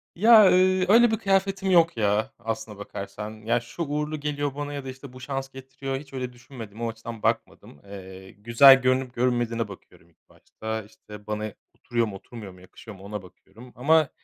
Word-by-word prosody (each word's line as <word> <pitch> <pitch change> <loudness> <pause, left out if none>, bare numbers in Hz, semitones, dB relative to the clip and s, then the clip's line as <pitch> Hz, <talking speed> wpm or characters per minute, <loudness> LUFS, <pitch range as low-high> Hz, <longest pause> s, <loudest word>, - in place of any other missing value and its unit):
Ya, 215 +1 +7
eee, 185 0 +3
öyle 235 +2 +6
bir 220 - +1
kıyafetim 195 0 +1
yok, 170 -6 +4
ya, 110 +4 0
aslına 110 -2 -5
bakarsan, 100 +1 -7
ya, 120 +2 +2
şu 120 +8 -6
uğurlu 150 +1 -3
geliyor 145 -1 -3
bana 145 0 -5
ya 140 -2 -6
da - - -5
işte 130 0 -10
bu 130 - -11
şans 135 0 -4
getiriyor 135 0 -6
hiç 140 0 -12
öyle 125 -1 -4
düşünmedim. 120 -3 -11
O 115 - -1
açıdan 115 0 -9
bakmadım. 70 - -2
Eee, 95 -1 -11
güzel 120 +6 +6
görünüp 130 0 +1
görünmediğine 120 -2 0
bakıyorum 95 -3 -15
ilk 85 - -37
başta 110 0 -6
işte 105 0 -14
bana 105 -1 -3 0.2
oturuyor 120 -1 -1
mu 100 - -7
oturmuyor 105 -1 -10
mu 90 - -17
yakışıyor 100 +3 -13
mu 95 - -15
ona 105 0 -6
bakıyorum. 100 +6 -16
Ama, 155 +4 +3
120 Hz, 185 wpm, -25 LUFS, 105-145 Hz, 0.2 s, Ya